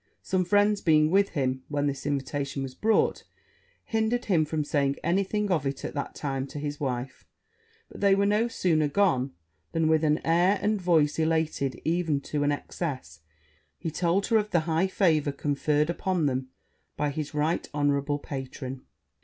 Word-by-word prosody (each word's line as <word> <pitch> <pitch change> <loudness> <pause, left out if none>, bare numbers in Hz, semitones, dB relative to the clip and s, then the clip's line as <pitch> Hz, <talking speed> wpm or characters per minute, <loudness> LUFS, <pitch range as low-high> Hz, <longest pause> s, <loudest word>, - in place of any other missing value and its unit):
Some 185 -1 0
friends 205 +2 +3
being 155 -1 +4
with 200 +1 +4
him 130 -4 -1
when 145 -1 -1
this 140 0 -2
invitation 140 0 -2
was 130 -1 -6
brought, 220 +10 +1 0.6
hindered 225 +2 0
him 170 -6 +3
from 155 0 -1
saying 140 -2 0
any 180 +5 +2
thing 210 +1 -2
of 160 -6 +2
it 135 0 -4
at - - -5
that 145 - -4
time 135 -1 -3
to 145 - -9
his 145 0 -4
wife; 130 -1 -4 0.6
but - - -12
they 200 -1 +5
were 200 +1 +2
no 210 +3 +2
sooner 160 -9 +1
gone, 145 -7 +1 0.4
than, 165 -1 +2
with 160 0 +3
an 150 0 +3
air 175 +5 +3
and 210 -1 0
voice 160 -4 +2
elated 160 -5 0
even 165 -3 +1
to 150 +1 -3
an 145 0 +2
excess, 130 - -5 0.6
he 165 -1 -4
told 175 +4 +1
her 230 - +3
of 210 -1 0
the 170 - +2
high 165 +3 +1
favour 160 -7 +2
conferred 150 +2 0
upon 180 -2 -1
them 130 -1 -1 0.5
by 150 -1 0
his 150 +1 -5
right 155 +3 0
honourable 145 0 +1
patron. 135 -2 -6
155 Hz, 175 wpm, -27 LUFS, 140-180 Hz, 0.6 s, they